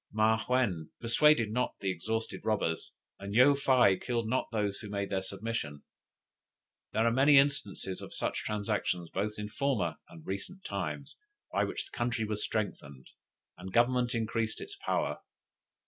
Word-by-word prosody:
Ma 110 +1 +3
yuen 105 -12 +1
pursued 115 -1 +4
not 125 +3 0
the 95 -2 0
exhausted 110 +6 -3
robbers; 100 -7 -1 0.3
and 100 +1 -5
Yo 130 +4 +7
fei 130 -8 +4
killed 115 +1 -2
not 130 +3 0
those 105 -3 -1
who 105 - -8
made 100 -1 -3
their 95 -1 +1
submission. 95 -7 -4 1.1
There 110 +1 +2
are 115 - +4
many 140 +4 +6
instances 135 -9 +1
of - - -8
such - - -2
transactions 100 -5 -1
both 105 +1 -2
in 105 0 -4
former 110 - 0
and 80 -2 -13
recent 100 - -5
times, - - -4 0.4
by - - +2
which - - -4
the - - -12
country 120 -2 0
was 105 -1 -2
strengthened, 70 -11 -4 0.5
and 95 +1 -7
government 120 +2 +3
increased 110 -1 -1
its 405 - -8
power. 395 - -1
110 Hz, 155 wpm, -31 LUFS, 100-125 Hz, 1.1 s, Yo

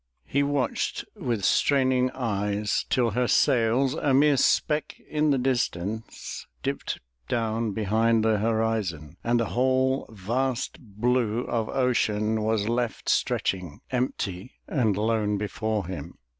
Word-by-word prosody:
He 140 - +1
watched 140 -3 -1
with 115 -6 -2
straining 130 -2 +3
eyes 105 -4 -1
till 120 -3 +2
her 125 +3 +1
sails, 125 +3 +3
a 140 -3 +1
mere 145 +1 +5
speck 150 +3 +1
in 150 0 +1
the 140 - +3
distance, 110 -5 -2 0.2
dipped - - -3 0.3
down 115 -1 0
behind 110 +2 +2
the 110 -2 +3
horizon, 110 -8 -1
and 120 0 +2
the 115 - +1
whole 130 +1 +2
vast 120 +6 -2
blue 120 +1 0
of 115 -3 -2
ocean 110 -4 +1
was 110 -1 0
left 120 0 -1
stretching 90 -6 0
empty 120 -5 -2
and 110 - +1
lone 105 -1 +1
before 105 0 -2
him. 85 -2 -7
115 Hz, 125 wpm, -26 LUFS, 105-130 Hz, 0.3 s, mere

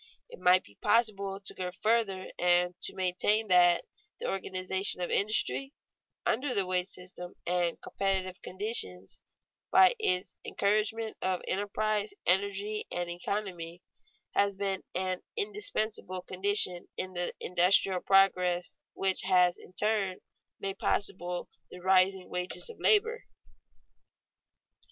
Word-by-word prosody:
It 485 - -12
might 180 +1 +5
be 100 - -21
possible 200 -4 +1
to - - +2
go 180 -1 -4
further 215 -4 +1
and 175 0 +3
to - - -2
maintain 195 +4 +1
that 175 -1 +5 0.3
the 480 - -4
organization 190 0 -1
of 175 - -3
industry, 220 +6 0 0.5
under 255 +3 0
the 195 - +1
wage 180 0 0
system 180 -1 -9
and 175 -1 0
competitive 190 -1 -2
conditions, 180 - +1 0.5
by 375 +4 +6
its 185 - +1
encouragement 215 +2 -1
of 185 -1 -1
enterprise, 210 +1 -1
energy, 200 +3 0
and 175 -1 -3
economy, 175 -2 -5 0.5
has 200 -1 +2
been 195 -1 -2
an 185 0 -1 0.2
indispensable 225 - -1
condition 185 -2 +1
in 185 0 -3
the 175 0 -2
industrial 180 +1 +3
progress 180 -2 +2
which 190 -1 +1
has 180 -1 +3
in - - -16
turn 200 -2 0 0.4
made 195 0 -4
possible 180 -3 -1 0.2
the 180 - -11
rising 190 0 +2
wages 180 - -1
of - - -17
labor. 455 +3 +2
190 Hz, 120 wpm, -30 LUFS, 180-210 Hz, 0.5 s, by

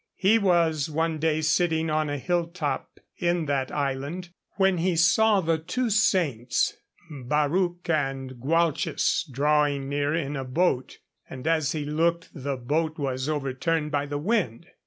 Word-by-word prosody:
He 205 +4 +4
was 165 -6 +2
one 160 +1 -1
day 155 0 +1
sitting 160 0 +1
on 155 -1 0
a 145 - -2
hill 175 +4 0
top 155 -6 -4 0.2
in 175 -2 0
that 140 -2 -1
island 145 +5 -3 0.2
when 190 -3 +2
he 180 +1 +1
saw 195 +5 +4
the 165 -2 0
two 235 +9 -2
saints 160 - +1 0.4
Barruc 150 +6 -1
and 135 -5 -2
Gwalches 165 +2 +1
drawing 145 0 +1
near 145 +1 0
in 145 -3 -2
a 135 - -3
boat, 130 0 0 0.3
and 130 +1 -8
as 160 -4 +1
he 150 -2 -3
looked 165 +3 0
the 140 -3 -4
boat 155 +6 -1
was 135 -1 -2
overturned 150 +2 -1
by 145 -1 -1
the 145 0 -3
wind. 170 - -1
155 Hz, 150 wpm, -26 LUFS, 140-170 Hz, 0.4 s, He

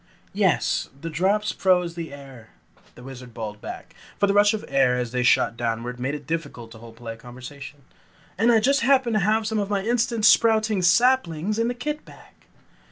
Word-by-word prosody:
"Yes, 195 -5 +1
the 165 +3 -6
drops 200 +6 +1
froze 180 -2 +1
the 165 -2 -7
air," 135 -5 -12 0.5
the 120 - -13
Wizard 125 -2 -11
bawled 105 -2 -6
back, - - -9 0.3
for 200 - +4
the 200 - +1
rush 205 0 +5
of 215 - -7
air 135 -2 +2
as 120 -2 -3
they 125 0 -1
shot 120 -1 +3
downward 120 +1 -3
made 130 +4 -2
it 145 -1 -9
difficult 140 -7 -5
to 110 - -12
hold 115 0 -13
polite 115 -1 -8
conversation, 130 +4 -11 0.5
"And 225 +5 +3
I 225 - +5
just 275 +4 +2
happened 260 -1 +3
to 215 - +2
have 215 +3 +1
some 220 0 -1
of 200 -1 -2
my 200 -2 -1
instant 235 -1 0
sprouting 220 -2 +4
saplings 210 -1 +2
in 230 - +1
that 245 0 -4
kit 300 +4 -4
bag." - - -17
175 Hz, 195 wpm, -23 LUFS, -, 0.5 s, rush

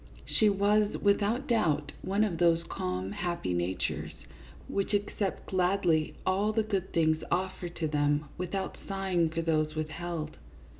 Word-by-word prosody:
She 215 - +3
was, 205 +1 +3
without 210 +6 +2
doubt, 215 - +1
one 200 +3 +1
of 180 -6 -1
those 170 -1 +4
calm, 90 - -3
happy 170 - -2
natures, 90 +1 -2 0.5
which 200 +1 0
accept 200 -1 -2
gladly 180 -4 +2
all 195 +3 +2
the 220 0 +1
good 195 -3 -2
things 160 -1 +2
offered 180 -1 -2
to 160 - -1
them 145 0 +1
without 185 +2 -3
sighing 190 -4 +1
for 165 +1 -2
those 155 -1 +1
withheld. 155 0 -4
175 Hz, 140 wpm, -30 LUFS, 155-200 Hz, 0.5 s, those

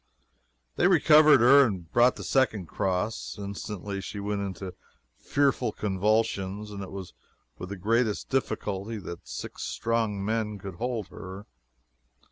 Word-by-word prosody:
They - - +4
recovered 155 -5 +6
her 140 +4 +8
and 95 -9 -3
brought 120 +1 +4
the - - -8
second 110 -8 +1
cross. 95 +5 -2
Instantly 100 0 -5
she 100 - -6
went 100 0 -2
into 95 -1 -5 0.5
fearful 135 -5 +1
convulsions, 105 0 0
and 100 -1 -6
it 95 - -7
was 95 -2 -8 0.5
with 90 - -6
the 100 - -5
greatest 110 +3 0
difficulty 110 -5 -2
that 85 -4 -8
six - - -7
strong 105 - -1
men 110 -1 -1
could 95 -2 -8
hold 120 -3 -3
her. 95 0 -9
105 Hz, 135 wpm, -27 LUFS, 95-115 Hz, 0.5 s, her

